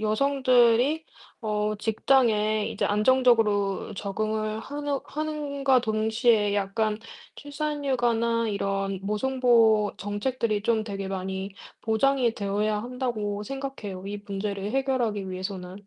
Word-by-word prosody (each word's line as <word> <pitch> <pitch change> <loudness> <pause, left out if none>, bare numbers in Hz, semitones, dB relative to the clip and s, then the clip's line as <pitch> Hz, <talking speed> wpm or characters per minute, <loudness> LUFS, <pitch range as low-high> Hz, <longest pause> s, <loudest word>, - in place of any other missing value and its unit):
여성들이 255 +4 +3 0.4
어 210 -1 -1
직장에 215 -2 +2
이제 205 - -1
안정적으로 215 -3 +2
적응을 215 +2 -2
하는 285 +2 -3
함과 285 -3 0
동시에 220 -1 +2
약간 210 +2 0 0.4
출산 295 0 -4
휴가나 235 -3 +1
이런 195 -1 -2
모성보호 225 -1 +3
정책들이 210 +1 -2
좀 225 0 +1
되게 200 -2 -5
많이 190 +1 -4 0.3
보장이 240 +1 +2
되어야 210 +1 -1
한다고 230 -5 -3
생각해요 265 -8 -6
이 205 +1 -4
문제를 200 0 -3
해결하기 240 -8 0
위해서는. 185 +1 -6
220 Hz, 270 characters per minute, -26 LUFS, 205-255 Hz, 0.4 s, 여성들이